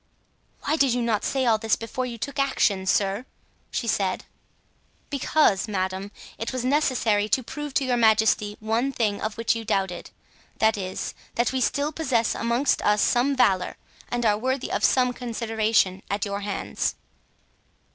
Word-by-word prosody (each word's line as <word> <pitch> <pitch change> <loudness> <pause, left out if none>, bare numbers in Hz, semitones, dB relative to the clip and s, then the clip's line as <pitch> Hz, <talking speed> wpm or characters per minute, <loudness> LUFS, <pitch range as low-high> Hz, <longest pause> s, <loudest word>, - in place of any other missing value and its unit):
"Why 305 +3 +1
did 270 -5 +3
you 245 - 0
not 225 -3 0
say 265 -1 0
all 225 -2 +3
this 220 0 +2
before 250 +3 -4
you 235 -1 -6
took 280 +5 -5
action, 205 -8 +1
sir?" 195 +4 +1 0.5
she - - -3
said. 195 -4 0 0.9
"Because, 275 -7 +2
madame, 190 -1 -2 0.3
it 225 - -3
was 255 -1 -3
necessary 245 -7 +2
to 255 +5 +2
prove 295 +3 -6
to 275 - +2
your 250 -1 +1
majesty 220 -2 +3
one 225 +5 0
thing 215 -6 -1
of 215 0 -3
which 230 0 +1
you 230 - -4
doubted— 195 -5 -2 0.5
that 220 0 +3
is, 190 -2 -4 0.2
that 240 0 +1
we 260 -1 -1
still 285 +4 0
possess 260 -8 0
amongst 240 +4 +1
us 210 0 +3
some 260 +3 +2
valor 190 -8 +2 0.3
and 240 -1 -1
are 210 -1 +3
worthy 260 +2 -2
of - - -1
some 250 -1 +3
consideration 225 -5 0
at 200 0 -1
your 200 0 -3
hands." 205 -1 -2
230 Hz, 165 wpm, -25 LUFS, 205-255 Hz, 0.9 s, did